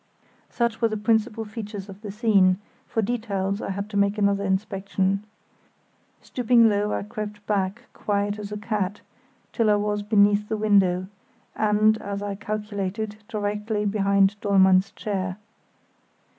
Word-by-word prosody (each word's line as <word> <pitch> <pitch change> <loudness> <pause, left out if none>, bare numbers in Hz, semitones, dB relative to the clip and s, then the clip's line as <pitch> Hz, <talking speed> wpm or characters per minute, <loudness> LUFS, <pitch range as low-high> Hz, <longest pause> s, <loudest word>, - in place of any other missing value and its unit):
Such 235 -1 -1
were 230 - +4
the 215 -1 -3
principal 220 +1 +1
features 210 -2 -7
of 195 0 -11
the 210 - -7
scene; 200 -4 +3 0.3
for 225 - -1
details 200 -3 -2
I - - -4
had 200 +1 -3
to 205 - -2
make 200 +1 +2
another 200 -1 +2
inspection. 195 0 -1 1.0
Stooping 240 -2 +4
low, 210 0 +1
I - - -1
crept 210 0 -7
back, 195 -2 -1
quiet 205 0 -1
as 205 0 -7
a 210 - -3
cat, 205 -2 -2 0.5
till 230 -3 +2
I 210 - +5
was 205 0 -1
beneath 205 0 +3
the 220 - -1
window, 195 -4 +3 0.5
and, 215 +1 +3
as 200 0 -4
I 205 -1 -3
calculated, 210 0 -4
directly 210 0 -2
behind 200 0 +2
Dollmann's 190 -1 +4
chair. 190 -3 -3
205 Hz, 145 wpm, -24 LUFS, 200-215 Hz, 1.0 s, I